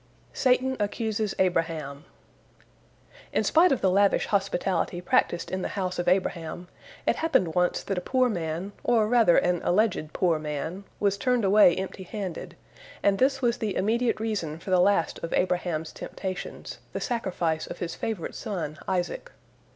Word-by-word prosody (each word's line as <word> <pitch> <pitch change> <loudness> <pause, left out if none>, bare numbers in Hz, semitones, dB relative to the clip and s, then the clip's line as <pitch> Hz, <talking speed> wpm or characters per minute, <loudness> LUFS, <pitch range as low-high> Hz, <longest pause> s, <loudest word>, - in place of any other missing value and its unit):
SATAN 260 0 +2
ACCUSES 215 0 -1
ABRAHAM 165 -5 -1 1.3
In - - +1
spite 340 +3 +5
of 270 - +1
the 190 - +3
lavish 200 +1 +3
hospitality 195 -2 0
practiced 175 -1 +1
in 185 - -2
the - - -1
house 185 -2 -2
of 175 - -2
Abraham, 175 -1 -1 0.4
it - - +2
happened 185 - +1
once 180 +1 +1
that 195 -2 -2
a - - -9
poor 255 +6 +2
man, 175 -2 -3
or 225 -3 +3
rather 225 -6 +5
an 175 -1 +2
alleged 180 -5 +1
poor 170 -4 +1
man, 155 +6 -4
was 200 -1 +1
turned 250 -3 +1
away 195 -3 +6
empty 190 0 -5
handed, 190 -2 -6 0.5
and 200 -1 +3
this 270 +1 +2
was 240 0 +1
the 210 -5 -2
immediate 230 +4 +1
reason 205 -9 -2
for 180 +3 -7
the 180 -1 +5
last 195 -3 +2
of 165 - -3
Abraham's 175 -3 0
temptations, 185 -2 -6
the - - -2
sacrifice 180 - -1
of - - -7
his 170 -2 -4
favorite 215 -7 -4
son 170 -8 -5
Isaac. 185 - -2
190 Hz, 160 wpm, -27 LUFS, 175-215 Hz, 1.3 s, away